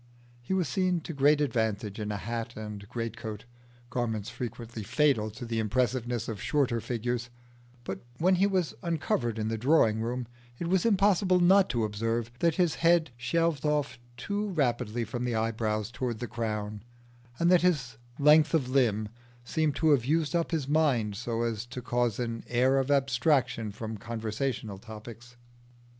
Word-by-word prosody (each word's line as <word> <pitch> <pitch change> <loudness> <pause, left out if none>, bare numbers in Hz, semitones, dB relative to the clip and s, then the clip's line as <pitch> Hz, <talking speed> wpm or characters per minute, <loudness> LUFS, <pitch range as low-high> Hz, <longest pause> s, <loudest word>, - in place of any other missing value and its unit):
He 190 +10 -2
was 180 -4 +1
seen 180 +4 +1
to 165 - -6
great 145 +1 +4
advantage 110 -5 -1
in 105 0 -3
a 105 - -2
hat 115 +3 -4
and 105 -2 -7
greatcoat 110 -2 -5 0.5
garments 110 -2 -2
frequently 115 -1 -6
fatal 120 0 +2
to 110 +3 -8
the 115 -1 -2
impressiveness 120 +1 0
of 110 -4 -5
shorter 130 -6 +1
figures; 120 +1 -2 0.5
but 95 -4 -5 0.2
when 185 +4 +3
he 195 +3 +4
was 180 - 0
uncovered 135 -8 -1
in 110 -1 -1
the 115 0 -2
drawing 115 -4 +3
room, 120 +2 -2 0.3
it 170 - -4
was 190 +4 +2
impossible 195 -3 +3
not 185 +2 +5
to 120 -3 0
observe 115 +2 -1
that 170 -2 +2
his 175 -4 +2
head 165 -3 +4
shelved 150 +5 0
off 150 -4 0 0.2
too 200 - -2
rapidly 120 - 0
from 120 +1 -4
the 120 -2 -1
eyebrows 110 -1 -1
towards 120 -2 -3
the 120 - -3
crown, 105 -3 -3 0.6
and 170 +1 +3
that 180 - +6
his 140 -10 0 0.2
length 150 +2 +5
of 140 -6 +1
limb 115 -6 +2 0.4
seemed 155 +3 0
to 160 -2 +3
have 135 -5 +4
used 155 +4 +1
up 170 -1 +1
his 155 -5 -1
mind 140 -9 +2
so 115 +2 -2
as 115 -2 -2
to 125 +1 -6
cause 120 -2 0
an 115 -2 -3
air 130 +3 +3
of 135 +1 -1
abstraction 130 -4 +2
from 110 +1 -6
conversational 110 -1 -3
topics. 115 +2 -11
120 Hz, 165 wpm, -29 LUFS, 110-150 Hz, 0.6 s, that